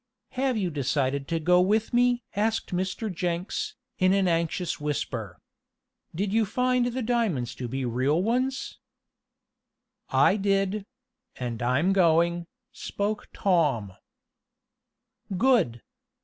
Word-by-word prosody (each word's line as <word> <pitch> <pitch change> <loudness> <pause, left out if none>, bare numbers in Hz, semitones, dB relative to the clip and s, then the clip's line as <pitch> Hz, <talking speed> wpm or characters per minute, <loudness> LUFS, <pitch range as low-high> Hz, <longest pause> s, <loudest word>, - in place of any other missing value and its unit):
"Have 260 -2 0
you 185 -4 -1
decided 140 -1 -1
to 165 -1 -1
go 180 +3 +4
with 215 +5 +1
me?" 245 0 +3
asked 220 -1 0
Mr. 190 +3 -2
Jenks, 180 - -3 0.2
in 185 0 +4
an 195 -1 +2
anxious 170 +1 -1
whisper. 150 -1 -3 0.8
"Did 200 +3 -1
you 225 0 +4
find 250 +3 +1
the 250 +1 -2
diamonds 215 - 0
to 125 - -5
be 130 +2 -3
real 130 +8 +1
ones?" 255 +5 -1 1.3
"I 205 - +4
did; 195 0 0 0.5
and 120 -3 -4
I'm 135 +10 +2
going," 170 -1 +3 0.2
spoke 210 -3 -3
Tom. 145 - +1 1.4
"Good! 190 - +2
185 Hz, 115 wpm, -26 LUFS, 150-220 Hz, 1.4 s, go